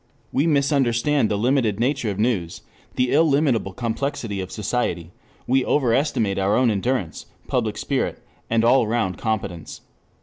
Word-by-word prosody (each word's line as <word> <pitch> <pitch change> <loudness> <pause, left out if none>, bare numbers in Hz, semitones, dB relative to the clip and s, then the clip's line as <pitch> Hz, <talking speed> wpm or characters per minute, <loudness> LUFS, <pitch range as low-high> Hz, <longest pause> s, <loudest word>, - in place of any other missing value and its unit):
We 145 +5 +1
misunderstand 140 -3 +2
the 105 - 0
limited 115 -2 +1
nature 125 -1 0
of 100 - -4
news, 105 -7 -1 0.3
the 125 0 +1
illimitable 140 -8 +2
complexity 115 -1 -3
of 95 - -7
society; 95 -7 -2 0.3
we 130 +1 +2
overestimate 120 -7 +1
our 95 +2 +2
own 125 -2 +3
endurance, 105 -4 -2 0.2
public - - -1
spirit, - - -1 0.3
and 115 0 +2
all 120 -1 +4
round 110 -5 -1
competence. 100 -8 -4
115 Hz, 135 wpm, -22 LUFS, 100-135 Hz, 0.3 s, all